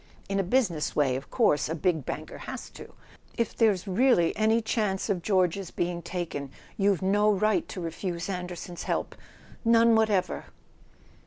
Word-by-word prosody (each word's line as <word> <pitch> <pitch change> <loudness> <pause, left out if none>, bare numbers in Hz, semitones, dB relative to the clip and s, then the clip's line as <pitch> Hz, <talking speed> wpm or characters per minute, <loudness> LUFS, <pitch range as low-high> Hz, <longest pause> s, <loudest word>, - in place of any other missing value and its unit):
In 195 0 -1
a - - +2
business 180 - 0
way, 135 -4 +2
of 135 - -6
course, 150 - +2
a 160 - -1
big 160 -3 0
banker - - -5
has - - -7
to. - - -12 0.4
If 230 -2 -1
there's 210 -4 +2
really 195 -3 +3
any 220 +2 +3
chance 215 -3 -1
of 185 -3 -1
George's 185 -1 +1
being 175 0 -2
taken 170 -5 -4 0.3
you've 200 -4 +1
no 205 +2 +3
right 215 +1 +1
to - - -7
refuse 170 +1 -4
An¬ 180 -2 -3
derson's 175 0 -7
help—none 230 0 0
whatever! 215 -4 +1
190 Hz, 155 wpm, -27 LUFS, 170-215 Hz, 0.4 s, really